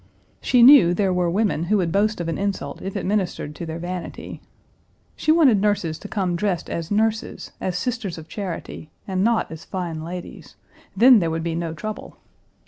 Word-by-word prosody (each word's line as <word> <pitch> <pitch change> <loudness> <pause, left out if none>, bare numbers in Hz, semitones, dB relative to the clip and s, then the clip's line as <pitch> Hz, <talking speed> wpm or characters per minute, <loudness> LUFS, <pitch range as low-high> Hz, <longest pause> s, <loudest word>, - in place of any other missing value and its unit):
She 245 -2 +4
knew 235 -10 +8
there 195 -1 +1
were 180 -1 +1
women 190 -4 0
who 210 +4 +2
would 175 -4 0
boast 210 +3 +1
of 170 - -3
an 165 - -3
insult 195 -8 -3
if 195 +1 -6
it 195 - -4
ministered 185 -7 -2
to 165 +2 -7
their 160 0 -5
vanity. 175 +1 -6 0.7
She 310 - +1
wanted 280 - +5
nurses 195 -6 0
to 205 - -8
come 190 -4 -1
dressed 180 -2 -2
as 165 -1 -4
nurses, 220 +1 -1
as 180 -1 -2
Sisters 225 -3 -3
of 160 0 -10
Charity, 175 -5 -6 0.2
and 190 -1 0
not 230 -4 +1
as 160 0 -8
fine 170 -4 -5
ladies. 175 +2 -8 0.4
Then 245 +2 +7
there 170 -3 0
would 160 0 -3
be 165 -1 -2
no 165 -1 -3
trouble. 215 +7 -7
185 Hz, 190 wpm, -22 LUFS, 165-210 Hz, 0.7 s, knew